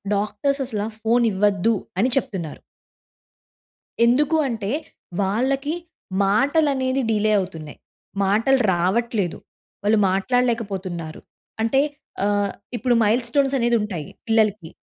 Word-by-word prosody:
Doctors 215 +8 -1
అసలా 210 -4 -2 0.2
phone 235 +2 +3
ఇవ్వద్దని 205 +2 +1
చెప్తున్నారు. 180 - -3 1.4
ఎందుకు 290 +6 +3
అంటే 225 -4 -3 0.5
వాళ్ళకి 265 +9 0 0.5
మాటలనేది 270 +4 +2
డిలే 215 0 +2
అవుతున్నాయి. 165 -6 -6 0.5
మాటలు 225 +7 +3
రావట్లేదు. 190 +2 0 0.5
వాళ్ళు 210 +1 +3
మాట్లాడలేకపోతున్నారు. 195 -6 -1 0.4
అంటే 270 +5 +3 0.4
ఆహ్, 205 -1 +1 0.2
ఇప్పుడు 245 0 +1
మైల్ 225 +4 +2
స్టోన్స్ 275 +2 +1
అనేది 240 -1 +2
ఉంటాయి 185 -8 -4 0.2
పిల్లలకి 215 -6 +1
220 Hz, 95 wpm, -22 LUFS, 195-250 Hz, 1.4 s, phone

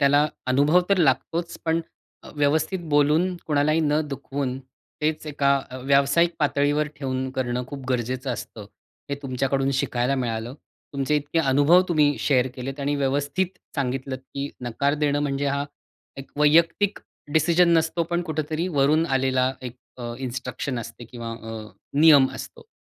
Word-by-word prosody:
त्याला 145 +1 +4 0.2
अनुभव 145 +7 +4
तर 200 - +4
लागतोच 165 +3 0
पण 165 0 +1 0.4
अ, - - -12
व्यवस्थित 155 +5 +1
बोलून, 150 +5 +3
कोणालाही 155 +1 +2
न 150 0 +2
दुखवून, 135 -1 -4 0.4
तेच 155 +1 -1
एका 140 -2 +1 0.2
अ, 130 - -7
व्यावसायिक 140 +5 +3
पातळीवर 145 0 +1
ठेवून 130 -1 -3
करणं 125 -2 -2
खूप 135 -1 -8
गरजेचं 125 +1 -1
असतं. 105 -3 -8 0.4
हे - - +1
तुमच्याकडून 135 +1 0
शिकायला 125 +2 0
मिळालं. 120 -1 -3 0.4
तुमचे 140 +2 0
इतके 150 +3 -1
अनुभव 145 +4 +5
तुम्ही 150 -4 +3
शेअर 130 -3 +2
केलेत 135 +2 -6
आणि 145 +1 0
व्यवस्थित 145 +7 -1 0.2
सांगितलत 130 -1 -2 0.2
की 140 +1 -3 0.2
नकार 140 +5 0
देणं 145 0 +2
म्हणजे 140 0 -1
हा 140 0 0 0.5
एक 135 - -9
वैयक्तिक 165 +7 +3 0.3
डिसिजन 170 +2 +4
नसतो, 165 +1 +1
पण 175 +1 -1
कुठेतरी 155 +2 -2
वरून 155 +4 +3
आलेला 130 -1 +1
एक 125 -1 -7 0.2
अ, 120 -1 -5
इन्स्ट्रक्शन 130 0 -4
असते 115 +1 -8
किंवा 115 -1 -7
अ, 110 -1 -8 0.3
नियम 145 -4 +7
असतो. - - -9
140 Hz, 145 wpm, -24 LUFS, 130-155 Hz, 0.5 s, नियम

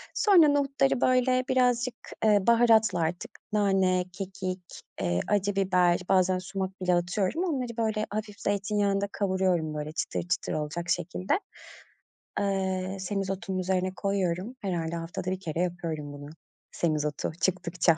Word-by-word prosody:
Sonra 375 -7 +6
nohutları, 275 -2 +2
böyle, 255 0 +3
birazcık, 250 -1 +2 0.3
eee, 210 -1 +6
baharatla 225 -5 +5
artık 170 +5 -2 0.2
nane, 190 -3 +2
kekik, 190 -1 -5 0.4
eee, 85 0 +1
acı 205 -1 +1
biber 180 -3 +3
bazen 185 -1 +3
sumak 190 0 -5
bile 180 -1 +2
atıyorum 185 - 0
onları, 255 -9 -2
böyle, 220 -1 0
hafif 210 0 -5
zeytinyağında 200 0 0
kavuruyorum, 185 -5 0
böyle, 150 0 -4
çıtır 160 - -2
çıtır 180 - -1
olacak 155 +3 -3
şekilde 180 - 0 1.0
Eee, 190 -1 -1
semizotunun 195 0 -2
üzerine 185 0 0
koyuyorum. 195 +2 -1
Herhâlde 170 -4 -2
haftada 170 +2 -4
1 185 - -2
kere 165 -3 -4
yapıyorum 165 -5 -3
bunu 145 0 -9 0.4
semizotu 150 -3 -1
çıktıkça. 175 -3 +2
190 Hz, 125 wpm, -28 LUFS, 175-210 Hz, 1.0 s, Sonra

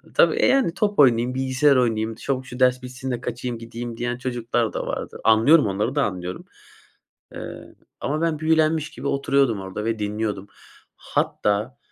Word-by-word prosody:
Tabii, - - +5
e, - - +2
yani, 265 -11 +3
top 205 -2 -1
oynayayım, 125 -1 +4
bilgisayar 135 +2 +3
oynayayım, 115 -3 +1
çabuk 130 +2 -3
şu 125 0 -9
ders 125 0 +3
bitsin 125 +1 -6
de 120 - -3
kaçayım, 120 0 -4
gideyim 115 0 -7
diyen 120 0 -2
çocuklar 120 -2 -1
da - - -3
vardı. - - -5
Anlıyorum, 115 +8 +5
onları 105 +8 -1
da 145 - +3
anlıyorum. 90 -3 -4 0.9
Eee, - - -9 0.3
ama 150 +3 -2
ben 165 -2 0
büyülenmiş 155 -1 +2
gibi 145 - -8
oturuyordum 135 -6 +1
orada 95 +3 -6
ve 115 -1 -1
dinliyordum. 105 -1 -3 0.5
Hatta, 105 +6 -1
125 Hz, 160 wpm, -23 LUFS, 110-140 Hz, 0.9 s, Tabii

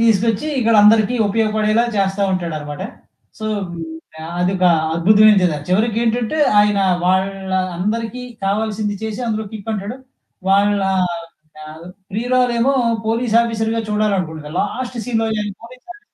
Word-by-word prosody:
తీసుకొచ్చి 225 +2 +2
ఇక్కడ 230 -1 +2
అందరికి 215 +2 +5
ఉపయోగపడేలా 215 +1 +1
చేస్తా 195 0 0
ఉంటాడన్నమాట. 155 -3 -4 0.6
సో, 220 - -6 0.3
హ్మ్, 165 -1 -6 0.6
అదొక 185 +1 +1 0.3
అద్భుతమైనది 200 +2 +5
కథ. 150 - -3
చివరికేంటంటే, 230 +6 0 0.2
ఆయన 205 -1 +2 0.3
వాళ్ళ 190 +1 0 0.3
అందరికి 225 +5 -2 0.2
కావాల్సింది 210 +1 -1
చేసి, 220 +1 -4
అందులో 220 -1 -2
కిక్ 220 0 -6
అంటాడు. 210 +5 -5 0.5
వాళ్ళ 200 +1 +3 0.8
ఆహ్, 155 +2 -11 0.3
ప్రియురాలేమో 245 +3 +1 0.3
పోలీసు 230 0 +1
ఆఫీసర్‌గా 225 0 -1
చూడాలనుకుంటాది. 180 -8 -2
లాస్ట్ 250 +4 -4
సీన్‌లో 225 -1 0 0.3
పోలీస్ 250 +2 -14
ఆఫీసర్ 415 - -11
215 Hz, 110 wpm, -18 LUFS, 195-230 Hz, 0.8 s, అందరికి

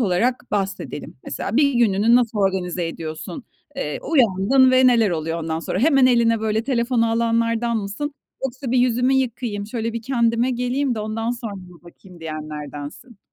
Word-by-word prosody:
olarak 235 +5 0
bahsedelim. 195 -8 -4
Mesela 210 +5 -4
1 280 -2 +3
gününü 225 -1 +3
nasıl 235 -3 +2
organize 185 -3 0
ediyorsun? 165 - -7 0.3
Eee, 150 - -3
uyandın 260 - +3
ve 255 0 +5
neler 230 -5 +4
oluyor 165 0 -2
ondan 160 0 -2
sonra? 180 - -3
Hemen 270 +1 +4
eline 230 -2 +3
böyle 220 0 0
telefonu 235 -2 +1
alanlardan 230 0 +1
mısın? 220 +8 -4 0.3
Yoksa 260 0 -4
bir 255 - +3
yüzümü 250 +1 +2
yıkayayım, 235 -5 -2
şöyle 230 0 -3
bir 230 - -5
kendime 235 0 +1
geleyim 250 +2 -1
de 220 - -4
ondan 225 +2 -2
sonra 235 -3 -5
bir 180 -3 -13
bakayım 175 0 -16
diyenlerdensin. 155 - -7
230 Hz, 160 wpm, -22 LUFS, 190-250 Hz, 0.3 s, ve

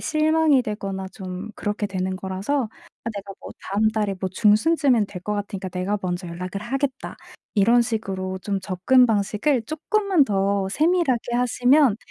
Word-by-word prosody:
실망이 310 -3 +3
되거나 195 -3 -4
좀 190 +1 -7
그렇게 210 0 -2
되는 185 -1 -3
거라서 195 +8 -2 0.4
'아 230 - -2
내가 200 -1 -6
뭐 - - -9 0.2
다음 210 +2 +3
달에 210 -2 -1
뭐 190 - -1
중순쯤에는 225 - +3
될 185 -2 -8
것 210 +2 -2
같으니까 200 -2 -4
내가 185 +3 -2
먼저 180 0 -3
연락을 180 +3 -5
하겠다.' 270 +3 -3 0.4
이런 230 +3 +5
식으로 195 -5 -3
좀 200 0 -2
접근 190 +8 +3
방식을 220 +4 +1
쪼끔만 350 - +1
더 195 -2 0
세밀하게 300 - +1
하시면 250 +1 +3
210 Hz, 330 characters per minute, -23 LUFS, 190-260 Hz, 0.4 s, 이런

